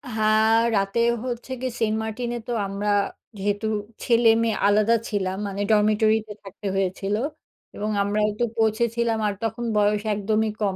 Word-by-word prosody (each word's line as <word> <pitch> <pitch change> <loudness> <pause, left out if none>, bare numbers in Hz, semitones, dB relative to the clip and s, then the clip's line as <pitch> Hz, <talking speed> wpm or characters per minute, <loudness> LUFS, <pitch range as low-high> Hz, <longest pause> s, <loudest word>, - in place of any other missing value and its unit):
হ্যাঁ, 220 +1 +4 0.2
রাতেও 220 +4 +2
হচ্ছে 245 +1 -5
গিয়ে 255 -2 -2
সেন্টমার্টিনে 220 +2 -1
তো - - -3 0.2
আমরা 200 +1 -3 0.5
যেহেতু 205 +2 -1 0.4
ছেলেমেয়ে 230 -2 +3
আলাদা 215 +3 +4
ছিলাম, 190 -3 -1
মানে 200 0 -4
ডরমিটরিতে 215 0 +2
থাকতে 195 +1 -8
হয়েছিল। 195 +1 -1 0.6
এবং 210 +1 -3
আমরাও 210 +1 +1
একটু 225 +3 -1
পৌঁছেছিলাম, 225 +1 +1
আর 205 - 0
তখন 225 +2 -2
বয়স 210 0 +2
একদমই 215 +2 0
কম। 195 -2 +1
215 Hz, 135 wpm, -24 LUFS, 205-225 Hz, 0.6 s, হ্যাঁ